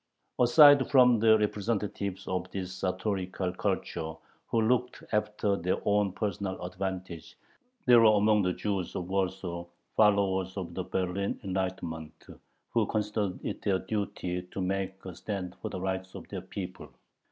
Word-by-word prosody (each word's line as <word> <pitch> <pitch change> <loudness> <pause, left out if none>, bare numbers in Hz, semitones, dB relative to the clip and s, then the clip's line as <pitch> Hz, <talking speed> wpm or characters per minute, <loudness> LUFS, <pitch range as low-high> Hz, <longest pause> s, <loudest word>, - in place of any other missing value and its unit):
Aside 140 +2 +7
from 125 -4 +6
the 110 0 +6
representatives 105 -2 -2
of 95 0 -2
this 95 -1 -5
sartorial 95 0 -2 0.2
culture, 80 -2 -2 0.3
who 115 - +1
looked 125 +2 +1
after 105 -1 +1
their 90 0 0
own 105 -1 +2
personal 100 -2 -3
advantage, 95 -2 -5 0.5
there 120 -1 +8
were 110 -2 +6
among 105 +1 +4
the 90 -1 +1
Jews 95 0 -3
of 90 - -3
Warsaw 95 -2 -2 0.3
followers 100 -3 +3
of 90 -3 -4
the 90 0 -4
Berlin 95 +1 -2
"enlightenment," 90 -5 -4 0.5
who - - +2
considered 105 -3 -1
it - - -4
their 95 -2 +2
duty 95 -2 -3
to 90 +2 -9
make 95 0 -2
a 95 - -6
stand 95 -1 -5
for - - -3
the 95 - -5
rights 95 0 -3
of - - -9
their - - -5
people. - - -7
95 Hz, 145 wpm, -29 LUFS, 90-105 Hz, 0.5 s, there